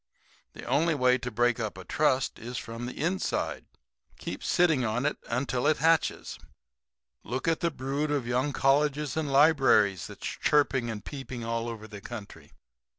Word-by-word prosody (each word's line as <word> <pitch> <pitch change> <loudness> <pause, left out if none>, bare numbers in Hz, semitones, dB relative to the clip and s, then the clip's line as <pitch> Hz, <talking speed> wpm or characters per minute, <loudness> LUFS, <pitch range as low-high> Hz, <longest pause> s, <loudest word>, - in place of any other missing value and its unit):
The - - -10
only 155 +5 +2
way 125 -2 +3
to 125 - -4
break 120 +1 +1
up 110 -3 -3
a 95 - -9
trust 140 -4 +1
is 120 +2 -6
from 115 +1 -6
the 125 - -8
inside. 175 +5 -1 0.5
Keep - - -6
sitting 160 -7 +3
on 120 +4 -1
it 150 - 0
until 125 +1 0
it 155 - +3
hatches. 165 0 +1 0.8
Look 130 +7 -4
at 165 -1 +2
the 170 - +1
brood 140 +1 -2
of 145 -4 0
young 125 +4 0
colleges 145 +2 +1
and 155 -3 -1
libraries 135 - +4
that's - - -10
chirping 135 -5 +1
and 105 -2 -6
peeping 130 -4 -6
all 115 0 -2
over 110 -1 -7
the 105 -2 -10
country. 110 -3 -9
130 Hz, 165 wpm, -28 LUFS, 115-150 Hz, 0.8 s, libraries